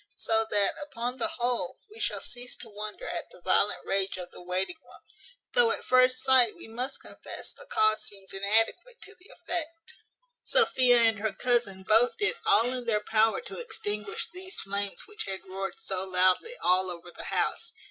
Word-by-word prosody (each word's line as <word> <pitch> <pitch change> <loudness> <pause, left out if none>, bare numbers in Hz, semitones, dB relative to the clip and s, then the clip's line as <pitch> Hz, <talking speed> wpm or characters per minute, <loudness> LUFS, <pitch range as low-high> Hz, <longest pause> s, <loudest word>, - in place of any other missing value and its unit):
So 225 0 +1
that, 205 -1 +3
upon 250 -3 -4
the 330 - +1
whole, 245 - -2
we 440 - -13
shall - - -1
cease 245 0 -6
to 230 - -10
wonder 210 0 -6
at 175 - -5
the - - -15
violent 190 +3 +2
rage 195 -1 0
of 180 -1 -8
the - - -12
waiting 185 - -3
woman; - - -18 0.5
though 485 -2 +5
at - - -3
first 255 0 +4
sight 260 -4 +6
we - - -12
must 250 +4 -4
confess - - -9
the - - -13
cause 215 - +3
seems 195 -1 -8
inadequate 225 - +1
to 410 - -10
the 375 0 -18
effect. 335 +3 -4 0.5
Sophia 255 - +4
and 225 -2 +3
her 220 0 -1
cousin 235 -6 0
both 225 +5 +4
did 420 +3 0
all 405 - +5
in 250 -1 -4
their 210 -2 0
power 220 - +3
to - - -9
extinguish 210 - -4
these 375 +2 -7
flames 200 0 -2
which 425 +1 -6
had 190 -1 -5
roared 195 +1 -5
so 190 -1 -3
loudly 185 - +3
all 185 +1 +4
over 175 0 -8
the - - -10
house. 455 - -1
225 Hz, 185 wpm, -28 LUFS, 195-300 Hz, 0.5 s, sight